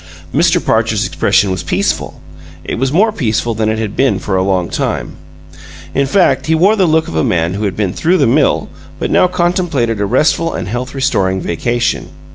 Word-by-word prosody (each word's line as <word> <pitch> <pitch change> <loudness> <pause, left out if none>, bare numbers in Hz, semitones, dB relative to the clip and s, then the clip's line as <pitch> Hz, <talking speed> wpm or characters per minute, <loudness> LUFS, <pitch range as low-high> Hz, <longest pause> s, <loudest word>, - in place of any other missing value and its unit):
Mr. - - +3
Parcher's - - +1
expression 100 -2 +1
was 95 - -2
peaceful. - - -2 0.4
It 100 - -4
was 130 +1 0
more 210 +8 +3
peaceful 120 - -1
than 110 0 -1
it 110 - -1
had 110 -2 -4
been 130 -7 +2
for 95 - -3
a 95 - +2
long 95 -2 0
time. - - -3 0.8
In 140 0 +1
fact, 140 -5 +2
he 160 - +3
wore 195 +7 +4
the 190 -4 +2
look 160 0 +2
of - - -6
a 80 - +1
man 85 0 0
who 105 +2 -3
had 100 - -3
been 100 -4 -1
through 180 +3 +1
the 140 - +3
mill 135 +5 +2 0.3
but - - -3
now - - +4
contemplated 175 - 0
a 100 - 0
restful 165 +8 +1
and - - -4
health 120 +6 -4
restoring 95 -9 0
vacation. 120 +8 -2
120 Hz, 200 wpm, -14 LUFS, 100-160 Hz, 0.8 s, wore